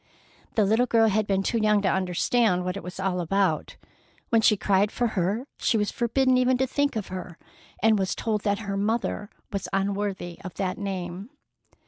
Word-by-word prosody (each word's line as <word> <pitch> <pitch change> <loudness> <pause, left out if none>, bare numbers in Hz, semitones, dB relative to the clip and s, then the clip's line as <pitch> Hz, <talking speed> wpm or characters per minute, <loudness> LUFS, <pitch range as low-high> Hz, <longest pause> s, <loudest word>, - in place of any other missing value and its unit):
The 215 - +4
little 225 +5 +3
girl 225 -2 +4
had 215 0 +1
been 195 -1 +1
too 230 - 0
young 210 -1 +3
to - - +2
understand 185 +1 +1
what 180 +1 -2
it 200 - -5
was 180 +2 -8
all 185 -2 0
about. 185 -2 0 0.5
When 230 -1 +4
she 210 -1 +4
cried 200 +1 +2
for 240 -1 0
her 205 +5 -1
she 225 - +2
was 210 -1 0
forbidden 255 +2 +2
even 255 0 +3
to 265 - +2
think 285 +1 0
of 215 -3 -3
her, 180 -2 -7 0.5
and 220 -2 +4
was 190 -1 -1
told 215 -2 -1
that 200 0 0
her 200 0 -2
mother 210 0 -1 0.2
was 200 - -2
unworthy 195 -3 -2
of 185 - -8
that 185 -2 -2
name. 190 0 -5
200 Hz, 190 wpm, -26 LUFS, 190-225 Hz, 0.5 s, The